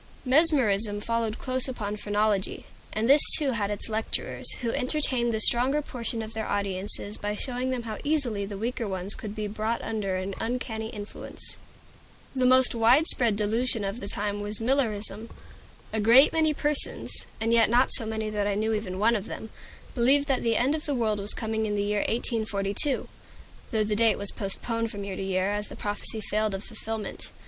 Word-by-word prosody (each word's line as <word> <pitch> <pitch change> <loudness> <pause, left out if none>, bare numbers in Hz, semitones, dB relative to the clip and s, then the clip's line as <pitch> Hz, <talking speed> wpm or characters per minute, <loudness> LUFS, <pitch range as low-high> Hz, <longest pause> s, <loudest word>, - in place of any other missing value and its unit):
Mesmerism 250 -8 +4
followed 230 0 -2
close 255 0 -1
upon 210 -5 -4
phrenology; 205 -1 -1 0.3
and 220 +2 -1
this 280 +3 +6 0.2
too 285 -3 +1
had 210 -4 -2
its 205 -1 -1
lecturers, 220 0 +2
who 230 - 0
entertained 255 -3 +2
the 220 - -2
stronger 250 +6 +4
portion 235 -4 -5
of 220 +1 -8
their 220 -1 -4
audiences 200 +1 -1
by 210 0 -3
showing 255 +2 -2
them 255 -2 -3
how 220 -2 -6
easily 275 -9 0
the 200 0 -6
weaker 235 +2 -3
ones 190 +1 -1
could 210 -1 -7
be 215 -1 -4
brought 215 +2 -3
under 210 -4 -3
an 185 +1 -4
uncanny 225 -2 -4
influence. 205 -1 -9 0.8
The 255 -1 +2
most 255 0 +5
widespread 235 -1 +4
delusion 220 +2 0
of 200 +4 -4
the 200 - -6
time 205 0 0
was 205 +1 -2
Millerism. 225 -3 -1 0.6
A 220 - -1
great 235 +7 +6
many 315 -1 +2
persons 295 0 -1
and 225 +1 0
yet 230 -2 +4
not 245 +3 +3
so - - +2
many 220 -1 -3
that 205 -1 -1
I 205 - -1
knew 220 +2 -1
even 205 -4 -4
one 225 +4 +2
of 210 -1 -4
them 220 - -8 0.4
believed 270 +4 +3
that 265 - +1
the 230 -1 +1
end 260 +4 +2
of 310 -1 -4
the 290 - -1
world 220 -4 -1
was 200 +1 0
coming 220 -1 -2
in 205 - -2
the 205 - -1
year 205 0 -1
1842; 220 +3 -1 0.6
though 220 -3 0
the 210 0 -1
date 225 +1 +3
was 200 0 +2
postponed 230 +3 -2
from 205 -2 -6
year 200 -1 -5
to - - -6
year, 190 0 -1
as 205 0 -2
the - - -10
prophesy 205 +1 -4
failed 215 -1 -1
of 195 - -7
fulfillment. 225 -1 -6
220 Hz, 190 wpm, -26 LUFS, 205-245 Hz, 0.8 s, this